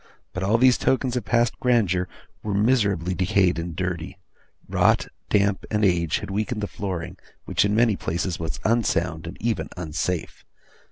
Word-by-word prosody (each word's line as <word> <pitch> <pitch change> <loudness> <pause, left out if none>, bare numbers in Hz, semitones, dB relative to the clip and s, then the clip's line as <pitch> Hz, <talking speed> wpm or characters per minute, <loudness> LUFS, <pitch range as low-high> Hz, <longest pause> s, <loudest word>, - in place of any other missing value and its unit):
But 90 - -4
all 100 +4 +3
these 125 +1 +5
tokens 130 -1 +1
of 125 - -2
past 120 -1 +1
grandeur 100 -8 +2 0.3
were 105 -2 -2
miserably 100 -6 +2
decayed 90 -1 +2
and 85 -1 -5
dirty; 90 0 -3 0.5
rot, - - +3 0.2
damp, 100 -1 +2
and 105 -1 +2
age, 85 -4 +2
had - - -6
weakened 105 +3 -2
the - - 0
flooring, 95 -6 -5 0.3
which - - +2
in 100 +1 +1
many 115 -2 +4
places 85 +1 -2
was 80 -1 -4
unsound 100 -8 +1
and 85 - -8
even 115 0 -1
unsafe. 85 +1 -3
100 Hz, 160 wpm, -24 LUFS, 90-110 Hz, 0.5 s, these